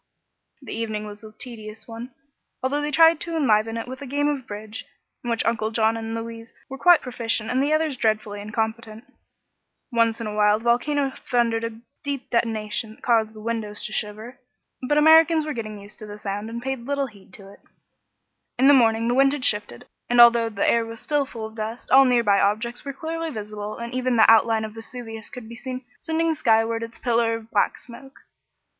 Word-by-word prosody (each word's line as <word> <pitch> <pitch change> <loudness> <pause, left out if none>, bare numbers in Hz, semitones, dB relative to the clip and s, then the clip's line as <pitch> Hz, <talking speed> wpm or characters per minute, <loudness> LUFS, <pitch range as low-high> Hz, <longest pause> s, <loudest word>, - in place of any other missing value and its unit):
The - - -7
evening 215 -2 -3
was 205 0 -10
a 215 - -10
tedious 220 -2 -9
one, 235 +2 -8 0.5
although 285 +3 0
they 295 - -2
tried 325 +2 +5
to 335 -1 -4
enliven 225 -5 +2
it 230 - -5
with 260 +2 -8
a 280 - -6
game 290 +3 0
of 270 -5 -3
bridge, 210 +2 -7 0.4
in 240 - -4
which 230 -1 0
Uncle 220 -2 0
John 220 0 +2
and 225 0 -4
Louise 230 0 -7 0.2
were 270 0 -7
quite 350 -2 +6
proficient 230 -3 -2
and 255 +1 +2
the 285 +2 +1
others 310 -3 +1
dreadfully 215 -2 -1
incompetent. 220 +1 -4 0.9
Once 230 -1 +2
in 230 - -4
a 210 - -4
while 210 0 +4
the 220 - -11
volcano 270 +4 +1
thundered 235 -2 0
a 225 -1 -5 0.2
deep 280 -3 -4
detonation 220 -1 -1
that - - -27
caused 225 -2 +2
the 215 - -10
windows 220 -2 -4
to - - -6
shiver, 215 +5 -5 0.4
but 265 +3 0
the - - +2
Americans 320 0 +6
were 305 - -3
getting 215 -3 -6
used 205 +3 -13
to 215 - -9
the 205 0 -8
sound 205 +1 -4
and 235 +1 -6
paid 265 -1 -2
little 280 -1 0
heed 200 -6 -15
to 195 -1 -13
it. - - -19 1.0
In 260 +2 +4
the 285 - +8
morning 230 -3 +4
the 240 - +2
wind 270 +2 +4
had 290 -3 -3
shifted, 205 - -1 0.2
and 245 0 +3
although 235 -1 +7
the 205 -3 -1
air 235 0 +3
was 225 0 -8
still 290 0 0
full 225 -3 -7
of 220 - -9
dust 225 +2 -6
all 270 +1 +8
near 245 -2 +3
by 200 -2 +4
objects 220 +4 0
were 280 - -4
clearly 325 +3 -4
visible 210 -4 -6
and 235 +1 -6
even 255 -1 0
the 220 - +7
outline 225 0 +4
of 215 - -8
Vesuvius 225 -1 -8
could 245 -3 -9
be 235 - -9
seen 255 +1 -6
sending 325 0 0
skyward 225 -4 +2
its 230 0 -7
pillar 230 -2 +1
of 225 0 -10
black 205 - +1
smoke. 270 +3 -14
230 Hz, 210 wpm, -24 LUFS, 220-260 Hz, 1.0 s, the